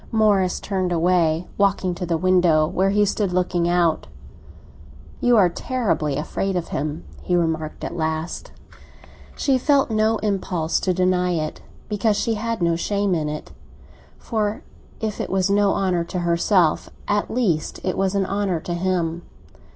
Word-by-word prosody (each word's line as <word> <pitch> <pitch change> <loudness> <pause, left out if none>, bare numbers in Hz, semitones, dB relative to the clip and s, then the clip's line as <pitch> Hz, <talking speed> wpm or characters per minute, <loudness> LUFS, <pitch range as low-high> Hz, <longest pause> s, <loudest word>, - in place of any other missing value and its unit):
Morris 205 -5 +2
turned 185 -3 -2
away, 170 -1 +2
walking 195 -2 +2
to 175 0 -5
the 165 -1 +1
window, 175 -3 +3
where 190 +4 +1
he 205 +1 +3
stood 200 -1 -1
looking 180 -1 0
out. 175 - +1 1.1
"You 245 -1 +4
are 195 -4 +6
terribly 175 - -1
afraid 190 +5 -2
of 175 -2 -2
him!" 155 +2 -3 0.2
he 180 - 0
remarked 160 -2 -1
at - - -4
last. 160 0 -3 0.8
She 270 -2 +1
felt 275 -2 +2
no 220 +1 +2
impulse 185 -5 0
to 185 - 0
deny 180 0 +2
it, 155 -2 -3 0.3
because 210 0 +1
she 230 - 0
had 225 -2 -2
no 170 0 +2
shame 200 +2 0
in 155 -3 -1
it; 150 0 -6 0.7
for 215 -2 -2 0.4
if 215 -2 -3
it - - -4
was 190 0 +1
no 200 0 +3
honour 185 -3 +1
to 180 +1 -4
herself, 170 0 +2 0.2
at 205 0 0
least 195 -11 -1
it 185 - -1
was 195 0 0
an 195 -1 +1
honour 195 -3 -1
to 175 - -4
him. 175 -2 -1
185 Hz, 160 wpm, -22 LUFS, 170-205 Hz, 1.1 s, are